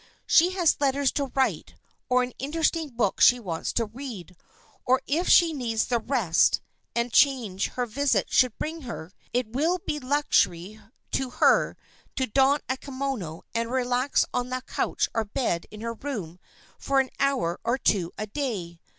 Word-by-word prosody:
She 355 +3 +4
has 350 -6 +2
letters 280 -1 +2
to 280 -2 -2
write, 265 -1 0 0.3
or 250 0 +4
an 250 - -5
interesting 320 +2 0
book 230 -6 -1
she 245 - +7
wants 175 -8 -3
to 230 - +1
read, 215 -6 -9 0.5
or, 255 +1 +3
if 330 +6 0
she 335 -2 +6
needs 230 -6 -1
the 240 -2 0
rest 225 -9 +2 0.4
and 235 0 -1
change 235 -9 +3
her 250 - -1
visit 270 +4 0
should 255 -3 +3
bring 320 +1 -4
her, 205 - -7 0.2
it 245 -3 -1
will 320 +7 +1
be 300 - -2
luxury 215 - 0 0.3
to 265 -1 -1
her - - +3 0.4
to 260 - 0
don 270 +4 +3
a 260 - -1
kimono 260 - -4
and 230 0 -1
relax 255 +1 +1
on 250 0 -1
the 255 0 -3
couch - - -1
or 225 - +1
bed 205 -5 -2
in 215 0 -10
her 230 0 -3
room 210 - -6 0.4
for 275 0 +1
an 265 -1 0
hour 255 -11 0
or 240 +2 +1
two 185 -9 +1
a 215 - -3
day. 205 - -4
250 Hz, 165 wpm, -26 LUFS, 215-275 Hz, 0.5 s, she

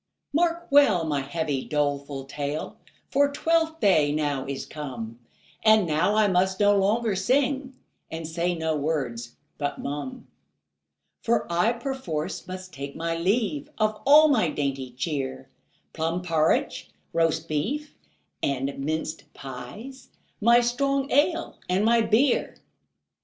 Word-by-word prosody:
Mark 340 +2 +1
well 250 -12 +5
my 145 -3 0
heavy, 145 -1 -2
doleful 140 -2 -2
tale, 145 +2 -4 0.4
For 285 +1 +3
Twelfth 325 +2 +1
day 155 -7 +4
now 145 -3 -1
is 140 -1 -4
come, 120 -6 -7 0.4
And 215 -2 +6
now 160 +6 +1
I 215 -1 +4
must 185 0 +1
no 205 0 +5
longer 210 +2 +1
sing, 265 +4 0 0.3
And 160 -1 -5
say 170 +2 -1
no 160 -1 -1
words 135 -6 -3 0.2
but 145 -1 -2
mum; 150 - -5 1.0
For 235 0 +1
I 180 +8 +3
perforce 235 - -4
must 185 -1 -8
take 140 -1 -7
my 165 0 -2
leave 185 - 0
Of 215 -1 0
all 305 +2 +8
my 225 - +3
dainty 135 -3 -2
cheer, 130 0 -4 0.4
Plum 165 +2 -2
porridge, 160 - +1 0.2
roast 165 -1 +1
beef, 275 - -2 0.5
and 140 0 -1
minced 155 +3 -3
pies, 210 - -9 0.3
My 235 +3 +6
strong 275 +3 0
ale 330 +4 +1
and 190 +3 +2
my 230 0 +4
beer. 240 +4 +2
170 Hz, 130 wpm, -26 LUFS, 145-235 Hz, 1.0 s, all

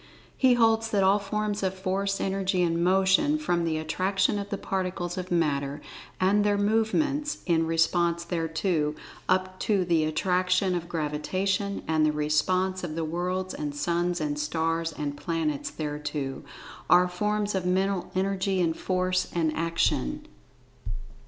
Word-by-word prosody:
He 255 -2 +4
holds 225 -1 +3
that 200 -3 +2
all 195 +2 +4
forms 210 0 -2
of 190 -1 -1
Force, 195 +1 -1
Energy 190 -1 0
and 170 0 +1
Motion, 190 - +3
from 175 - 0
the 160 -1 0
Attraction 190 +6 0
of 200 0 -5
the 200 - -2
Particles 180 -2 -3
of 185 -1 -5
Matter, 145 -4 0 0.4
and 200 +3 +3
their 205 -1 +2
movements 235 +8 0
in 165 -2 +2
response 170 +1 +2
thereto, 165 -2 -1 0.3
up 185 0 +1
to 200 -5 +1
the 165 -3 +2
Attraction 185 +3 +1
of 170 -1 -3
Gravitation, 185 +6 -1
and 160 -1 +2
the 155 - +4
response 185 +5 0
of 160 -3 -4
the 165 -1 -1
Worlds, 180 +3 -2
and 145 -1 -4
Suns, 175 +3 0
and 150 -1 -2
Stars, 165 +2 -1
and 145 -2 -4
Planets, 155 -2 -2
thereto—are 150 +4 -1
forms 210 +3 -1
of 185 -2 -1
Mental 190 0 0
Energy 195 0 0
and 165 -2 +1
Force, 185 0 0
and 160 -2 +1
Action. 165 - 0
180 Hz, 145 wpm, -27 LUFS, 165-195 Hz, 0.4 s, He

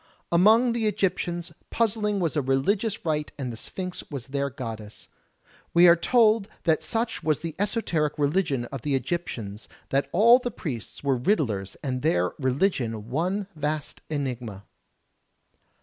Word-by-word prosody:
Among 220 +8 +5
the 230 -2 0
Egyptians, 175 -4 -1 0.2
puzzling 210 -2 +1
was 165 -4 -1
a 150 - +2
religious 185 - 0
rite 150 -2 -1
and 130 -4 -4
the - - -6
Sphinx 180 - -5
was 135 -5 -5
their 140 +1 -2
goddess. 115 -5 -8 0.7
We 175 +1 +8
are 170 - +8
told 220 +2 +3 0.2
that 160 -3 +2
such 225 0 -2
was 155 -2 +1
the 165 -2 -4
esoteric 185 - 0
religion 145 -4 +1
of 135 -3 -5
the 145 +1 0
Egyptians 125 - -4 0.2
that 135 +1 +1
all 235 +7 +7
the 245 - -3
priests 135 - -6
were 135 -3 +1
riddlers 115 - 0
and 130 -3 -2
their 90 -4 +2
religion 125 - 0
one 185 +8 0
vast 150 0 -3
enigma. 125 -9 -4
155 Hz, 145 wpm, -26 LUFS, 130-195 Hz, 0.7 s, We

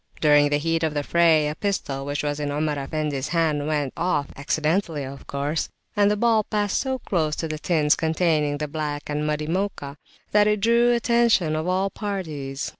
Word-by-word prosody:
During 145 -1 +5
the 145 - +2
heat 165 +2 0
of 160 -2 -1
the 145 - 0
fray, 160 -2 +3
a 150 - -2
pistol 150 -7 -3
which 145 +1 -2
was 145 0 -2
in 145 -1 -2
Omar 150 +1 -1
Effendi's 145 -1 -3
hand 155 -4 0
went 145 -3 -1
off 155 -5 -1
accidentally 155 +2 -1
of 135 +1 -9
course 145 +3 -2 0.3
and 205 -1 +4
the 210 - +1
ball 225 -1 +3
passed 205 -1 -1
so 265 -1 -2
close 160 -10 -1
to 165 - -3
the 155 -1 -5
tins 155 -3 +2
containing 160 -3 +1
the 150 0 -3
black 150 -1 -4
and 150 +1 -1
muddy 150 0 -1
Mocha, 165 -5 -3 0.3
that 210 0 +4
it 210 0 +2
drew 235 +3 +3
the 240 - +4
attention 235 -9 +2
of 155 +2 -2
all 190 +2 0
parties. 155 -10 -4
155 Hz, 195 wpm, -24 LUFS, 145-195 Hz, 0.3 s, During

